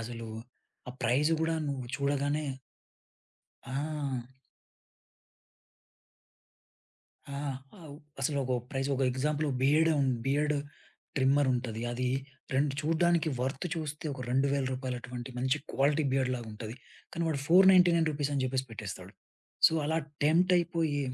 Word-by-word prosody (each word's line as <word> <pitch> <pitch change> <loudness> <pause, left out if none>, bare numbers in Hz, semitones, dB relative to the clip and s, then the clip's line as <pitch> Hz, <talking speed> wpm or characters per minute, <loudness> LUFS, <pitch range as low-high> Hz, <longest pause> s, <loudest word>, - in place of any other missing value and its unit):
అసలు 115 0 -6 0.6
ఆ 125 - -5
ప్రైజ్ 135 +7 +3
గూడా 165 0 +1
నువ్వు 130 -3 -3
చూడగానే 145 +2 0 1.2
ఆ! 135 -2 -4 3.0
ఆ! - - -3 0.4
అవు 155 -4 -10 0.3
అసలు 140 +2 0
ఒకొ 130 -1 0 0.2
ప్రైజ్ 135 0 -1
ఒకొ 135 0 +1
ఎగ్జాంపుల్ 150 +3 0
ఓహ్ 130 - -1
బియర్డే 155 +4 +4
ఉ - - +3 0.2
బియర్డ్ 150 +2 +2 0.6
ట్రిమ్మర్ 135 +1 +3
ఉంటది. 115 -2 -3
అది 125 +1 -1 0.5
రెండ్ 140 +1 +2
చూడ్డానికి 165 +1 +2
వర్త్ 135 +6 -2
చూస్తే 155 -1 -5
ఒక 135 - -8
2000 135 +1 +2
రూపాయలటువంటి 125 -1 -5
మంచి 130 +3 +2 0.2
క్వాలిటీ 145 +3 +2
బియర్డ్ 130 -1 +1
లాగుంటది. 110 -1 -7 0.4
కానీ 170 - -2
వాడు 140 -3 -1
499 180 -2 +6
రూపీస్ 145 -1 -2
అని 135 - +1
చెప్పేసి 130 0 -1
పెట్టేస్తాడు. 105 -4 -7 0.5
సో - - +3
అలా 160 +1 +1 0.3
టెంప్టయిపోయి 170 -2 +3
140 Hz, 120 wpm, -30 LUFS, 130-155 Hz, 3.0 s, 499